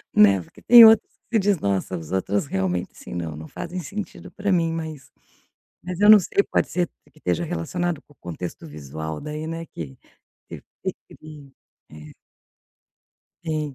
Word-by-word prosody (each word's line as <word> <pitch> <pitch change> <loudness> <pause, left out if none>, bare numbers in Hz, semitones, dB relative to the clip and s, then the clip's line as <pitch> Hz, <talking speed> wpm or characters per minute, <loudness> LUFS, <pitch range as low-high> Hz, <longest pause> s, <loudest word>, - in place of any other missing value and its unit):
Né, 100 -2 +6
porque - - -17
tem 235 -1 +10
outros 220 -1 +6 0.2
que 225 - +3
diz 200 -3 +2
nossa, 95 -3 -1
os 80 0 -9
outros 95 +3 0
realmente, 95 -5 -2
assim, - - -11
não, 85 -3 -4
não 80 +1 -9
fazem 175 - -6
sentido 200 +4 -7
para 200 0 -2
mim. 170 -3 +2
Mas, 160 -4 -6 0.7
mas 180 0 -6
eu 205 - +5
não 215 - +11
sei 195 +2 +1
pode - - +2
ser 175 -2 0 0.2
que - - -21
esteja 170 +2 -1
relacionado 175 -1 -2
com 145 - -23
o - - -49
contexto 90 -2 -7
visual 75 +1 -7
daí, 150 +1 -5
né, 165 +1 -5
que 70 - -9 0.5
eu - - -7 0.2
percebi. 150 -3 -9 0.4
É. 75 0 -12 1.3
Tem, 155 -4 -3
150 Hz, 165 wpm, -23 LUFS, -, 1.3 s, não